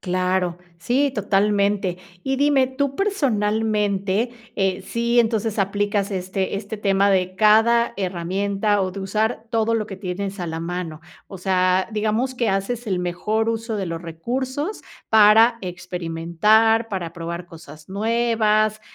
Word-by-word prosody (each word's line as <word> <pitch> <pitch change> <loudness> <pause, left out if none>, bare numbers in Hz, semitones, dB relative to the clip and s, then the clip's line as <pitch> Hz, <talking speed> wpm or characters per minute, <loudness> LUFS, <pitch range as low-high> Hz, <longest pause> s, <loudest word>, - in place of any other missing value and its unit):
Claro, 180 -1 -1 0.2
sí, 265 - +1
totalmente. 200 -3 +1 0.2
Y 270 0 -1
dime, 280 -2 +3
tú 275 +1 -2
personalmente, 215 - 0 0.2
eh, 190 -2 0
sí 235 +1 0
entonces 225 -2 +1
aplicas 205 +1 0
este 185 +1 -2
este 205 +2 -5
tema 200 -1 +2
de 185 -1 +1
cada 225 +3 +4
herramienta, 195 +3 -1
o 185 -1 -1
de 195 - -6
usar 220 +4 -1
todo 230 -1 +1
lo 215 -2 -1
que 195 - -8
tienes 195 +1 -4
a 175 - -3
la 160 0 -4
mano. 170 -2 -5 0.3
O 195 - -9
sea, 185 0 +1
digamos 220 +5 -1
que 235 - 0
haces 220 +5 -2
el 185 -3 -1
mejor 210 +6 -1
uso 225 0 -2
de 195 -3 -3
los 165 -1 -4
recursos 260 - -4 0.3
para 220 +2 +6
experimentar, 180 +6 +1
para 175 -5 -4
probar 170 0 -5
cosas 155 -3 -13
nuevas, 215 0 +1
205 Hz, 140 wpm, -22 LUFS, 185-225 Hz, 0.3 s, para